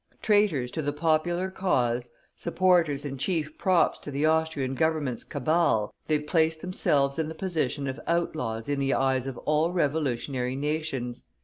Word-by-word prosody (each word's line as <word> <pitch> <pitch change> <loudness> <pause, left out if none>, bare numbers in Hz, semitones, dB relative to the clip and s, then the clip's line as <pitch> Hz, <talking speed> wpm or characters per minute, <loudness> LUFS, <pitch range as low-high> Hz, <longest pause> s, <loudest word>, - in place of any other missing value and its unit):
Traitors 205 - +2
to 160 - -3
the 145 -1 -1
popular 170 +4 +1
cause, 125 -11 0 0.3
supporters 170 -5 +2
and 135 -2 -5
chief 155 -1 -1
props 185 -3 +3
to - - -8
the 145 +2 0
Austrian 155 -4 +1
Government's 155 -4 0
cabal, 145 -6 +1
they 155 - +3
placed 160 +1 +1
themselves 150 -6 +1
in 160 -1 -1
the 160 - -7
position 150 -7 -1
of 130 +1 -4
outlaws 155 -10 -1
in 145 -1 -1
the 135 0 +1
eyes 130 -1 +1
of 130 -3 -5
all 155 +3 +2
revolutionary 140 -6 -1
nations. 140 -4 -3
150 Hz, 150 wpm, -27 LUFS, 135-165 Hz, 0.3 s, props